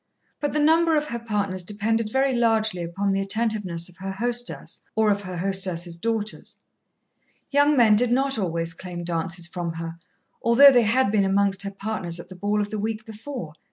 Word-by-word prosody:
But 290 - -2
the 300 - +1
number 320 +1 +4
of 300 0 -2
her 235 - -3
partners 205 -5 -2
depended 215 +4 -1
very 265 +1 +2
largely 220 -5 +1
upon 195 +4 -2
the 195 0 0
attentiveness 195 -5 0
of 180 - -14
her 195 +1 -5
hostess 240 +4 -2
or 220 -1 +3
of 200 0 0
her 185 -2 -6
hostess's 185 -2 -1
daughters. 215 +3 -3 0.9
Young 285 +1 +4
men 220 -4 +6
did 245 +2 +2
not 270 -1 +1
always 165 -3 -1
claim 175 0 -7
dances 175 +1 -2
from 170 -1 -4
her, 165 0 -6 0.4
although 265 +5 +7
they 245 -2 +5
had 250 -2 +2
been 210 -2 +3
amongst 195 0 +1
her 200 - -2
partners 195 -4 -3
at 170 - -10
the 185 - -10
ball 205 +3 0
of 205 0 -4
the 215 - -3
week 220 +1 -3
before. 220 - -7
205 Hz, 190 wpm, -24 LUFS, 180-235 Hz, 0.9 s, although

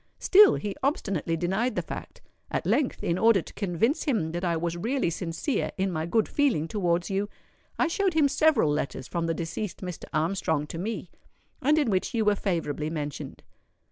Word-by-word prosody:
Still 405 +1 +7
he 205 -2 -4
obstinately 195 - 0
denied 195 +9 0
the - - -1
fact. - - -8 0.3
At - - -2
length, 290 -4 +1
in 170 +2 0
order 225 -3 +5
to - - -12
convince 205 - 0
him 215 - 0
that 175 +2 -4
I 170 -2 +1
was 170 +1 -2
really 230 +2 0
sincere 170 - -2
in 190 0 0
my 160 -1 -2
good 215 +5 +2
feeling 260 - +1
towards 175 -1 0
you, 200 +1 -1 0.5
I - - +3
showed 370 +1 0
him 305 -3 +5
several 280 - +3
letters 135 -3 -3
from 170 -1 -2
the 165 - 0
deceased 170 +4 -4
Mr. 180 -3 -6
Armstrong 160 -2 0
to 165 +2 -7
me, 200 -2 -4 0.5
and 300 +3 +3
in 285 -8 +2
which 190 +4 0
you 220 -2 +1
were 210 - +5
favourably 165 -7 -2
mentioned. 150 -3 -5
190 Hz, 185 wpm, -27 LUFS, 165-235 Hz, 0.5 s, Still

